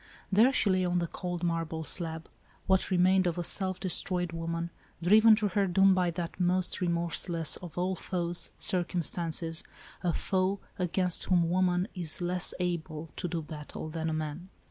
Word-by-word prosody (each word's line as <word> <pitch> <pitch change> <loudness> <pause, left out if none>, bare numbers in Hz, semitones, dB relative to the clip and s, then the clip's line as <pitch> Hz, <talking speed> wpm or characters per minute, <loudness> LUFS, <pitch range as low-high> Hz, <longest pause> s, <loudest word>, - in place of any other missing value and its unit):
There 220 +7 +5
she 210 -6 +1
lay 185 0 +1
on 180 0 0
the 175 - 0
cold 175 +1 -5
marble 165 -1 -2
slab, 160 -1 -1 0.4
what 190 0 +2
remained 185 0 +3
of 175 0 -2
a 175 - -2
self 185 +2 +3
destroyed 180 -1 -1
woman, 165 0 -4 0.3
driven 215 +4 +6
to 210 -1 -1
her 195 +1 +1
doom 195 +2 +4
by 180 -1 +1
that 170 +1 -5
most 180 +1 +1
remorseless 170 -1 +1
of 175 -2 -11
all 180 +1 0
foes, 175 -2 +1
circumstances, 170 -2 +1 0.4
a 175 -1 0
foe 190 +3 -1 0.2
against 180 0 +1
whom 170 -2 +2
woman 180 0 +1
is 170 -5 -1
less 180 0 0
able 165 -3 -4
to 180 - -3
do 165 -1 -4
battle 150 0 -8
than 160 0 -3
man. 155 +4 -6
175 Hz, 165 wpm, -29 LUFS, 165-185 Hz, 0.4 s, driven